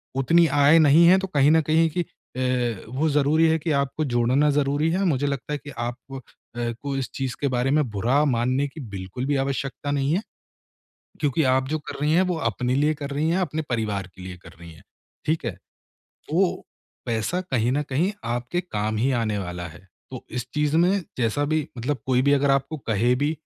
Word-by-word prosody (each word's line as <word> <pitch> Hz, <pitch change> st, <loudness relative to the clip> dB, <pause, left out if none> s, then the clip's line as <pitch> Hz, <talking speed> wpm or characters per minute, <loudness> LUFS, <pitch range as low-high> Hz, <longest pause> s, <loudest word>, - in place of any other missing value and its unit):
उतनी 165 Hz, +6 st, +4 dB
आय 145 Hz, +2 st, +5 dB
नहीं 155 Hz, +2 st, +6 dB
है 185 Hz, +2 st, +7 dB
तो 195 Hz, -, -3 dB
कहीं 145 Hz, -4 st, +3 dB
न 160 Hz, 0 st, +5 dB
कहीं 160 Hz, +1 st, +4 dB
कि -, -, +3 dB
अ, 125 Hz, -, -3 dB
वो 140 Hz, +6 st, 0 dB
ज़रूरी 150 Hz, +3 st, +3 dB
है 160 Hz, -, +3 dB
कि 160 Hz, +1 st, -2 dB
आपको 140 Hz, +2 st, 0 dB
जोड़ना 125 Hz, +3 st, +2 dB
ज़रूरी 145 Hz, +2 st, +1 dB
है 190 Hz, +3 st, 0 dB
मुझे 145 Hz, -5 st, +1 dB
लगता 140 Hz, +1 st, -3 dB
है -, -, -1 dB
कि 145 Hz, -, -11 dB
आप 120 Hz, +1 st, -3 dB, 0.2 s
अ, -, -, -5 dB, 0.6 s
को 140 Hz, -1 st, -3 dB
इस 135 Hz, -, -3 dB
चीज़ 135 Hz, -2 st, -3 dB
के 145 Hz, -, +1 dB
बारे 125 Hz, +2 st, +1 dB
में 150 Hz, +1 st, +3 dB
बुरा 120 Hz, +8 st, +2 dB
मानने 130 Hz, +4 st, +1 dB
की 150 Hz, +3 st, -10 dB
बिल्कुल 100 Hz, +6 st, -5 dB
भी 145 Hz, -, +1 dB
आवश्यकता 140 Hz, +1 st, -3 dB
नहीं 140 Hz, +1 st, 0 dB
है, 190 Hz, -, 0 dB, 1.0 s
क्योंकि 145 Hz, +1 st, +1 dB
आप 130 Hz, 0 st, 0 dB
जो 155 Hz, +2 st, -1 dB
कर -, -, -6 dB
रही 150 Hz, +1 st, +1 dB
हैं 180 Hz, -, +5 dB
वो -, -, -2 dB
अपने 125 Hz, +4 st, -2 dB
लिए 150 Hz, +3 st, +2 dB
कर 145 Hz, -1 st, -6 dB
रही 145 Hz, +3 st, 0 dB
है, 180 Hz, +3 st, +1 dB
अपने 160 Hz, -3 st, -2 dB
परिवार 105 Hz, -5 st, -2 dB
के 95 Hz, -, -10 dB
लिए 90 Hz, 0 st, -7 dB
कर -, -, -12 dB
रही 85 Hz, -1 st, -11 dB
है, 80 Hz, -, -17 dB, 0.4 s
ठीक 160 Hz, -1 st, 0 dB
है? 105 Hz, -, -3 dB, 0.8 s
वो 180 Hz, +2 st, +1 dB, 0.4 s
पैसा 115 Hz, +10 st, -1 dB
कहीं 125 Hz, -9 st, 0 dB
न 145 Hz, +2 st, +1 dB
कहीं 170 Hz, +10 st, +1 dB, 0.2 s
आपके 120 Hz, +8 st, -2 dB
काम 110 Hz, -11 st, -3 dB
ही 125 Hz, +5 st, +1 dB
आने 110 Hz, -2 st, -1 dB
वाला 90 Hz, -2 st, -5 dB
है। 85 Hz, +4 st, -15 dB, 0.2 s
तो -, -, -8 dB
इस 125 Hz, 0 st, -4 dB
चीज़ 150 Hz, +1 st, +1 dB
में 180 Hz, +4 st, +3 dB, 0.2 s
जैसा 125 Hz, +4 st, +1 dB
भी 155 Hz, -1 st, 0 dB
मतलब 130 Hz, +4 st, -2 dB
कोई 130 Hz, -1 st, +2 dB
भी 140 Hz, +1 st, +3 dB
अगर 140 Hz, 0 st, +3 dB
आपको 135 Hz, +3 st, 0 dB
कहे 115 Hz, +3 st, +2 dB
भी 145 Hz, +4 st, 0 dB
140 Hz, 210 wpm, -24 LUFS, 120-155 Hz, 1.0 s, है